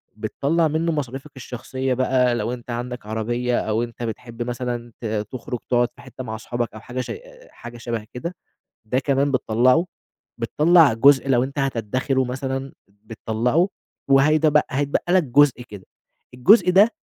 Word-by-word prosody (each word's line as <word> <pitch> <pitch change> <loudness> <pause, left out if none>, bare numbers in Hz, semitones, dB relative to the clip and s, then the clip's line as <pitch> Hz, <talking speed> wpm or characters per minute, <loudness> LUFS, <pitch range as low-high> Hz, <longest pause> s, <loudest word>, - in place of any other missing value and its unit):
بتطلّع 140 +10 0
منه 160 +2 0
مصاريفك 135 -1 -4
الشخصية 130 +1 -4
بقى 125 -1 +2
لو 120 +2 -2
أنت 125 0 -9
عندك 125 -1 -5
عربية 120 +3 -1
أو 110 +2 -1
أنت 120 0 -7
بتحب 115 +1 -5
مثلًا 120 -1 -4
ت - - -6
تخرج 110 +3 -4
تقعد 120 -1 +2
في - - -15
حتة 130 - -9
مع 110 -2 -5
صحابك 120 +1 -4
أو 110 - -9
حاجة 125 +3 -5
ش - - -8
أ - - -2 0.3
أ - - -22
حاجة 120 0 -11
شبه 115 -2 -4
كده، 170 +8 -5 0.5
ده 125 +4 0
كمان 140 +1 +1
بتطلعه، 130 +7 +3 0.5
بتطلع 150 +6 +4
جزء 140 +3 +5
لو 125 -1 +3
أنت 140 +2 -7
هتدخره 130 +1 0
مثلًا 135 +1 -4 0.2
بتطلعه 110 - -1 0.4
وهيتبق 150 +2 +4
هيتبقى 145 +5 -1
لك 185 - +5
جزء 135 -1 +3
كده، 105 -5 -12 0.5
الجزء 180 - +5
ده 200 +5 +6
125 Hz, 160 wpm, -22 LUFS, 120-140 Hz, 0.5 s, ده